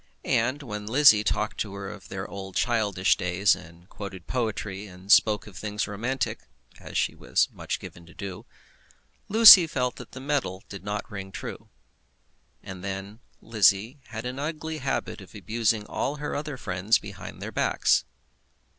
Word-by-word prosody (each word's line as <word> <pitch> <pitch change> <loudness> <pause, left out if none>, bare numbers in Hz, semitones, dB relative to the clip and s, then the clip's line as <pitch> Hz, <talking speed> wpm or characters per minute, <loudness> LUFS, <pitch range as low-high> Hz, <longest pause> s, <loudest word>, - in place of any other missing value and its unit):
And 130 +6 +1
when 105 -4 -6
Lizzie 115 -3 +6
talked 105 0 -1
to 100 -2 -3
her 100 0 -6
of 95 -1 -10
their 95 0 -5
old 95 -1 -8
childish 110 -6 +2
days, 90 +3 +2
and 85 +2 -15
quoted 100 -5 -8
poetry, 105 -4 -3
and 95 +1 -7
spoke 105 -1 +5
of 105 - -13
things 105 +2 -3
romantic, 115 +5 -2 0.4
as - - -6
she - - +1
was - - +1
much - - -4
given 85 -1 -11
to 85 - -16
do, 95 -2 -7 0.8
Lucy 210 -5 +10
felt 125 -5 -2
that - - -11
the 130 - -7
metal 135 -9 -2
did 100 -2 -9
not 105 +1 -4
ring 95 -2 -7
true. 90 - -8 0.9
And 90 -1 -9
then 100 +2 -6 0.2
Lizzie 110 +4 +2
had 110 0 -7
an 125 +2 -4
ugly 155 +1 -4
habit 135 -5 -3
of 95 - -14
abusing 110 +1 0
all 140 - -2
her 150 0 -4
other 145 -2 -4
friends 100 0 +1
behind 100 -3 -9
their - - -6
backs. - - +2
105 Hz, 165 wpm, -26 LUFS, 95-125 Hz, 0.9 s, Lucy